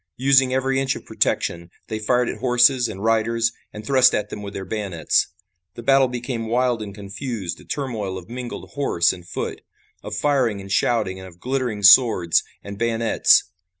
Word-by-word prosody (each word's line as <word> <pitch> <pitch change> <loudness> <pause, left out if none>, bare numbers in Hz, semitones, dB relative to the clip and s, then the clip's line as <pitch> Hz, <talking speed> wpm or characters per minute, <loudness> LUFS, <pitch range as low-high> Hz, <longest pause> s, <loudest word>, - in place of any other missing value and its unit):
Using 130 0 +4
every 130 +1 0
inch 135 0 0
of - - -10
protection, 85 0 -1 0.2
they 110 - -4
fired 125 +3 +1
at - - -5
horses 125 0 +3
and 100 -2 -7
riders 115 +1 +1 0.2
and 105 0 -9
thrust 130 0 +4
at 105 - -2
them 105 - -6
with 100 0 -8
their 95 - -5
bayonets. 95 -5 0 0.5
The 120 - -9
battle 135 +1 +4
became 120 -2 -4
wild 120 0 0
and 100 -2 -7
confused, 100 -1 -6
a - - -17
turmoil 110 -9 -4
of 90 - -10
mingled 120 +1 -7
horse 85 -12 +1
and 90 -1 -12
foot, 90 - -5 0.4
of - - -6
firing 130 -8 +1
and 95 0 -9
shouting 105 -3 0
and 95 - -10
of 85 -1 -16
glittering 125 -4 -3
swords 105 -5 +6 0.2
and 100 0 -8
bayonets. 115 -1 +3
115 Hz, 180 wpm, -22 LUFS, 100-125 Hz, 0.5 s, swords